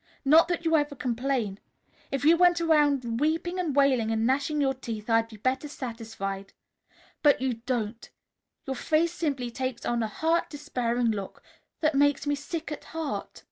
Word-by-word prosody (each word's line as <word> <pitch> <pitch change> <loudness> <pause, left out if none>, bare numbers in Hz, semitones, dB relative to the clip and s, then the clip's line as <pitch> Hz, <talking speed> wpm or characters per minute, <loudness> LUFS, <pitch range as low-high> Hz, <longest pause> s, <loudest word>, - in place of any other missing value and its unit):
Not 315 +5 +7
that 345 -1 -2
you 325 0 +3
ever 290 -1 +1
complain. 245 -5 -1 0.5
If 275 0 -2
you 325 +2 +7
went 350 0 +4
around 290 -8 +2
weeping 330 +5 0
and 325 -6 -1
wailing 265 -6 +3
and 225 0 +1
gnashing 280 +4 +1
your 270 -2 +2
teeth, 230 -4 -6
I'd 225 0 +3
be 220 -1 -12
better 260 +6 -1
satisfied. 220 -7 -6 0.7
But 290 -2 +5
you 250 -3 -2
don't. 230 -3 -2 0.6
Your 265 - -3
face 320 +5 +1
simply 280 -7 -2
takes 255 0 -4
on 240 -1 0
a 220 - 0
hurt, 325 +9 0
despairing 245 -6 -1
look 200 -3 -6 0.4
that 310 -1 +3
makes 285 +1 +3
me 290 - +1
sick 310 +3 -5
at 300 - -6
heart." 320 -3 -5
270 Hz, 170 wpm, -27 LUFS, 235-310 Hz, 0.7 s, Not